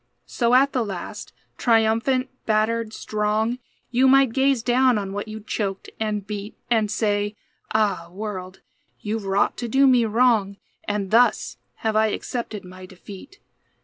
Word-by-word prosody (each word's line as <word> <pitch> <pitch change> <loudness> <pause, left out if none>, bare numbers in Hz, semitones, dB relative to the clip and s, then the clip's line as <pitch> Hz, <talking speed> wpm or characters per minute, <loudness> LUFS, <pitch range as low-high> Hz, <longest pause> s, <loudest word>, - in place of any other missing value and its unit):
So 240 0 +1
at 275 +2 +5
the 250 - +1
last, 195 -5 -7 0.3
triumphant, 230 +3 +2 0.2
battered, 220 +1 +1
strong, 215 +3 -1 0.3
You 255 +2 +4
might 270 -2 +5
gaze 270 -2 +2
down 250 0 +3
on 195 -1 -4
what 205 +2 -4
you 215 0 -7
choked 200 -2 -4
and 210 -2 -2
beat, 205 0 -6
And 220 -3 +2
say, 205 -1 0 0.4
"Ah, 205 -6 0
world, 190 -2 -6 0.4
you've 215 0 -3
wrought 195 +1 +1
to 240 - -4
do 270 +4 +4
me 250 -3 +5
wrong; 220 -3 +2 0.3
And 205 -2 -2
thus 230 -1 +3 0.3
have 220 -1 +1
I 220 0 +4
accepted 215 -2 -4
my 185 0 -11
defeat." 195 - -12
220 Hz, 145 wpm, -23 LUFS, 205-240 Hz, 0.4 s, at